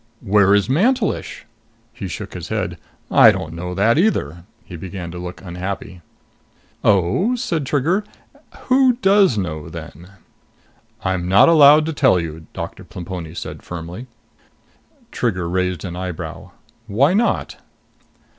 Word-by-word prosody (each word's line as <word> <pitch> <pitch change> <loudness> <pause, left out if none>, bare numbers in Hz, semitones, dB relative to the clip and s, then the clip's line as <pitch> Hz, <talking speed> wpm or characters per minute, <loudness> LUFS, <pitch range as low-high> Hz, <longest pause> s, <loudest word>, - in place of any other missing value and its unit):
"Where 100 -2 +4
is 100 -1 +2
Mantelish?" 215 - 0 0.5
He - - -6
shook - - -7
his - - -7
head. - - -3 0.3
"I - - +8
don't 80 - -5
know 90 +2 -5
that 110 - +3
either." 85 - 0 0.2
He 90 - -9
began 90 0 -7
to 90 - -7
look 90 0 -8
unhappy. 90 0 -6 0.8
"Oh?" 105 - +2
said 170 - -2
Trigger. 165 +10 +1 0.6
"Who 260 -1 +4
does 195 - +3
know 80 -6 -4
then?" 85 +1 -10 0.9
"I'm 90 -1 -1
not 95 - +6
allowed 150 -1 +7
to 160 - -3
tell 130 -10 +3
you," 80 -1 -7
Doctor - - -7
Plemponi 85 -2 -7
said - - -7
firmly. 90 +8 -8 1.0
Trigger 90 -8 -1
raised 90 -1 -1
an 85 -2 -6
eyebrow. 90 -2 -6 0.4
"Why 130 - +3
not?" 230 +4 0
95 Hz, 130 wpm, -20 LUFS, -, 1.0 s, I